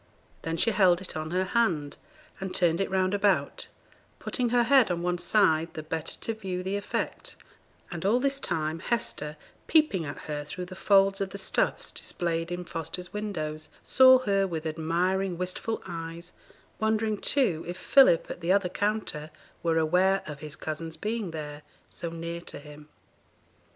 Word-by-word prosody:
Then 165 0 -3
she 230 - +2
held 185 -4 +4
it 185 - -7
on 155 0 -3
her 185 +2 +1
hand, 185 -9 0 0.4
and 190 -1 -4
turned 170 0 +3
it 195 - 0
round 190 0 +1
about, 200 -1 +1 0.5
putting 245 -2 -1
her 240 0 +4
head 255 -1 +5
on 175 -1 -1
one 175 0 0
side, 165 -6 +2
the 155 - -5
better 160 0 -4
to 225 - -2
view 185 -4 -4
the 190 +2 -2
effect; 205 0 -3 0.6
and 170 -3 -5
all 215 +6 +3
this 275 +1 +1
time, 155 - -2
Hester, 160 -8 -2 0.3
peeping 305 - +3
at 145 - -6
her 150 -1 -4
through 180 +5 -6
the 185 - -10
folds 195 0 +4
of 195 - -1
the 200 - -7
stuffs 195 - 0
displayed 165 -1 -3
in 175 0 -4
Foster's 170 +2 -5
windows, 155 -8 -4
saw 260 0 +7
her 195 -1 +2
with 165 -3 -4
admiring, 175 +4 0
wistful 185 +5 -3
eyes; 170 0 -7 0.5
wondering, 220 -1 +1
too, 185 - +1
if 175 +1 -5
Philip, 260 -5 +5
at - - -7
the 170 +2 +1
other 195 -2 +3
counter, 205 -7 -2 0.3
were 165 -1 +1
aware 180 +5 +3
of 150 -2 -7
his 155 0 -6
cousin's 160 +1 -5
being 215 +2 -2
there, 150 -2 -6 0.3
so 170 - -5
near 170 +1 -5
to - - -9
him. 150 +1 -12
180 Hz, 170 wpm, -28 LUFS, 160-200 Hz, 0.6 s, saw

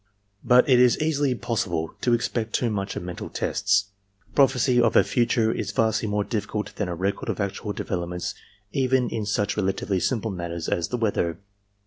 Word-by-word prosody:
"But 125 0 +5
it 130 -3 +5
is 125 -1 +5
easily 145 -4 +1
possible 100 -10 -2
to 120 -1 +3
expect 115 -1 -2
too 120 -3 +1
much 100 -1 -3
of - - -4
mental 90 -1 -6
tests. 100 0 0 0.4
Prophecy 130 -3 +4
of 115 -2 +3
the - - +6
future 115 -2 +1
is 100 -4 -3
vastly 110 +1 +1
more 105 0 0
difficult 105 -1 -3
than 105 -4 -1
a 85 - -3
record 95 +4 -2
of - - -2
actual 100 +1 -3
developments 90 -3 -3 0.4
even 130 -1 +1
in 110 -2 -3
such 105 0 0
relatively 95 -1 0
simple 115 +1 -1
matters 85 -2 -4
as 85 - 0
the 125 - -2
weather. 95 -7 0
105 Hz, 175 wpm, -25 LUFS, 95-120 Hz, 0.4 s, the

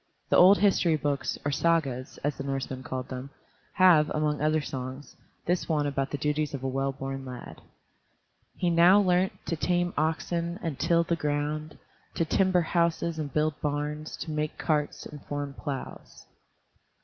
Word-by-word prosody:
The - - +3
old 190 +3 +8
history 190 -5 +3
books, 145 -2 -1
or 145 - +1
Sagas, 140 -5 0
as 145 0 0
the - - -6
Norseman 135 -1 -3
called 130 -1 -5
them, 130 +1 -6 0.4
have, 170 -5 +5
among 150 -1 0
other 155 +1 +2
songs, 130 -1 -6 0.3
this 175 +1 0
one 150 -2 +1
about 135 -1 -1
the 145 - -3
duties 150 +1 -1
of 135 - -7
a - - 0
well 135 +1 -1
born 135 0 -5
lad: 125 -2 -9 1.0
"He 175 -2 +1
now 175 +4 +6
learnt 185 -1 +2
To 165 - -1
tame 175 +2 0
oxen 170 +3 -1
And 160 -5 -3
till 170 0 +3
the 170 0 0
ground, 150 0 -2 0.4
To 165 - +1
timber 185 +2 +3
houses 170 -1 0
And 145 -2 -3
build 155 0 0
barns, 150 +1 -3
To 160 - -5
make 150 0 -2
carts 150 -2 -1
And 150 -2 -10
form 145 -1 -4
plows." 140 -1 -7
150 Hz, 165 wpm, -28 LUFS, 140-170 Hz, 1.0 s, old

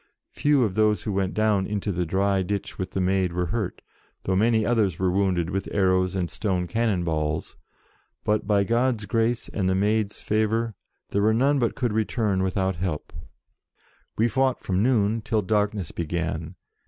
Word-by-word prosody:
Few 145 -3 +2
of 105 -5 0
those 105 +1 +2
who 105 - -2
went 95 -1 -1
down 105 -3 +2
into 105 0 -2
the 90 -2 -2
dry 95 +2 +1
ditch 100 +2 -4
with 95 0 -2
the - - -1
Maid 95 -1 +1
were 90 0 0
hurt, 110 -6 -3 0.4
though 95 - 0
many 110 +2 +3
others 105 -8 +1
were 95 -1 +1
wounded 90 -3 +1
with 95 0 -2
arrows 95 -1 +2
and 90 -2 0
stone 90 -2 -1
cannon 100 0 0
balls, 75 -2 -2 0.7
but, 105 -1 0
by 100 -1 +3
God's 115 0 +1
grace 115 +2 0
and 95 -3 -1
the 95 - +2
Maid's 105 +1 0
favour, 110 +1 0 0.4
there 100 - +1
were 110 +1 +3
none 140 +4 +3
but 120 -3 0
could 120 -4 -1
return 110 -2 0
without 95 -1 0
help. 85 -3 -3 1.0
We 115 - +3
fought 130 +2 0
from 95 0 0
noon 110 -2 +2
till 110 0 0
darkness 105 -3 0
began. 85 0 -3
100 Hz, 175 wpm, -25 LUFS, 95-110 Hz, 1.0 s, many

